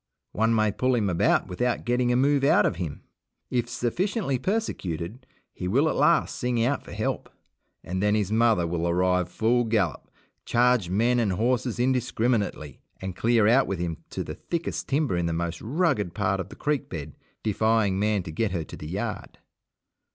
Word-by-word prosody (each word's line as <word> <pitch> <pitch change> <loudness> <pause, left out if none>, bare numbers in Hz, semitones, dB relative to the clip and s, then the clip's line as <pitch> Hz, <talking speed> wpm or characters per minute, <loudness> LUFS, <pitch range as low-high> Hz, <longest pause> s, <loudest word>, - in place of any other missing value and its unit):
One 115 +1 +2
may 110 -1 +2
pull 130 +5 +1
him 105 -5 +1
about 85 - +2
without 120 +7 -1
getting 125 0 +1
a - - +2
move 140 +2 +3
out 140 - +5
of 90 - 0
him. 85 -6 -5 0.5
If 120 -1 0
sufficiently 140 - -1
persecuted 120 - -3 0.3
he 90 - -5
will 135 - +3
at - - 0
last 170 -1 +3
sing 120 -2 0
out 140 +2 0
for - - -12
help, - - -3 0.5
and 95 +2 -3
then 105 +1 +3
his 105 -2 0
mother 110 -5 +3
will 85 0 -1
arrive 90 0 +1
full 120 +5 +2
gallop, 105 -9 -1 0.3
charge 120 -6 +2
men 115 +6 +2
and 105 -5 +1
horses 120 +3 0
indiscriminately, 120 - 0 0.2
and 95 -1 -5
clear 115 0 +3
out 125 +4 +4
with 95 - -2
him 85 -2 -3
to - - -4
the - - -6
thickest 170 -1 -4
timber 140 - +1
in 85 -1 0
the 85 - -1
most 85 +1 -3
rugged 125 - 0
part 95 -2 0
of 95 0 -5
the - - -11
creek 150 -2 -1
bed, 75 -4 -6 0.3
defying 110 -2 +2
man 105 -2 +1
to 85 - -7
get 110 +7 0
her 90 -4 -2
to - - -10
the 75 - -8
yard. 100 +5 -4
110 Hz, 185 wpm, -26 LUFS, 90-125 Hz, 0.5 s, out